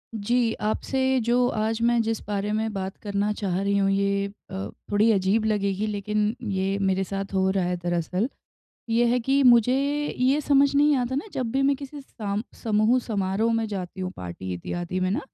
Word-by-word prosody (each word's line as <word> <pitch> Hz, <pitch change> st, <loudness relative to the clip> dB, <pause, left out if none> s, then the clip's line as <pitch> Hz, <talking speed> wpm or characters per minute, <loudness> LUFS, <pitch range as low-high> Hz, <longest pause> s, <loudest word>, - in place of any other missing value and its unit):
जी, 230 Hz, +2 st, +1 dB
आपसे 260 Hz, +5 st, 0 dB
जो 245 Hz, +1 st, +3 dB
आज 220 Hz, +1 st, 0 dB
मैं 235 Hz, 0 st, +3 dB
जिस 225 Hz, -1 st, -1 dB
बारे 205 Hz, 0 st, -2 dB
में 220 Hz, +1 st, -1 dB
बात 190 Hz, 0 st, -4 dB
करना 205 Hz, 0 st, -1 dB
चाह 195 Hz, -3 st, -2 dB
रही 200 Hz, 0 st, +1 dB
हूँ 195 Hz, 0 st, +2 dB
ये 200 Hz, 0 st, +1 dB, 0.2 s
अ, 95 Hz, +2 st, -4 dB, 0.2 s
थोड़ी 210 Hz, +2 st, +4 dB
अजीब 200 Hz, +2 st, +2 dB
लगेगी 205 Hz, -1 st, 0 dB
लेकिन 210 Hz, +1 st, -1 dB
ये 195 Hz, -3 st, -1 dB
मेरे 190 Hz, 0 st, +1 dB
साथ 195 Hz, +1 st, -5 dB
हो 190 Hz, 0 st, +2 dB
रहा 190 Hz, -1 st, 0 dB
है 180 Hz, 0 st, -1 dB
दरअसल। 175 Hz, +4 st, -1 dB, 0.6 s
ये 230 Hz, +1 st, +3 dB
है 240 Hz, +1 st, +2 dB
कि 270 Hz, +4 st, +2 dB
मुझे 245 Hz, -1 st, +6 dB, 0.4 s
ये 265 Hz, +4 st, +3 dB
समझ 280 Hz, -1 st, +3 dB
नहीं 295 Hz, +1 st, +4 dB
आता 250 Hz, 0 st, -1 dB
ना 285 Hz, +9 st, -2 dB
जब 250 Hz, -3 st, -2 dB
भी 270 Hz, +1 st, +1 dB
मैं 275 Hz, 0 st, +3 dB
किसी 285 Hz, +1 st, -8 dB
साम 210 Hz, -6 st, -4 dB, 0.2 s
समूह 220 Hz, +2 st, +3 dB
समारोह 205 Hz, +1 st, 0 dB
में 225 Hz, 0 st, 0 dB
जाती 190 Hz, -2 st, -5 dB
हूँ 185 Hz, 0 st, -2 dB
पार्टी 90 Hz, +1 st, -6 dB
इत्यादि 175 Hz, -, -4 dB
में 185 Hz, 0 st, +1 dB
ना, 200 Hz, -, 0 dB
210 Hz, 190 wpm, -25 LUFS, 195-240 Hz, 0.6 s, मुझे